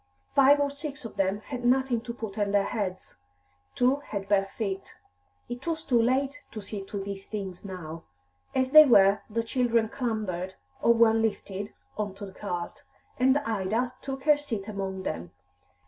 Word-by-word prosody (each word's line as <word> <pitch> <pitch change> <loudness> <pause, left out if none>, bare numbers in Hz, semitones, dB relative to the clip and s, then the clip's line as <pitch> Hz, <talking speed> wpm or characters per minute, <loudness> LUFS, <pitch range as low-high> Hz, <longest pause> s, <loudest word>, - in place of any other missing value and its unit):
Five 280 +1 +6
or 285 -1 +1
six 280 -3 -7
of 225 - -7
them 195 +1 0
had 250 0 -6
nothing 250 -1 +2
to 240 0 -5
put 220 -4 -6
on 205 -1 0
their 200 0 +3
heads; 190 - -4 0.6
two 255 +3 +3
had 200 -9 -6
bare 195 -1 +3
feet. 195 -3 -4 0.5
It 245 +5 -7
was 325 -1 -1
too 240 -6 +3
late 270 +4 +1
to 220 - -5
see 205 0 -5
to 205 - -6
these 195 0 -6
things 195 -4 -5
now; 165 -4 -7 0.5
as 260 0 +1
they 310 +1 +11
were, 200 -5 +6
the 230 +1 -1
children 230 -2 +1
clambered, 210 -7 -3 0.3
or 235 - +5
were 230 -1 +6
lifted, 205 -2 -2 0.3
on 205 -2 -2
to 200 +1 -7
the 190 - -11
cart, 175 -4 -5 0.4
and 260 +2 +5
Ida 225 0 -1
took 270 -1 -5
her 300 0 +5
seat 225 -9 -4
among 195 -2 -4
them. 85 - -4
220 Hz, 175 wpm, -28 LUFS, 195-255 Hz, 0.6 s, they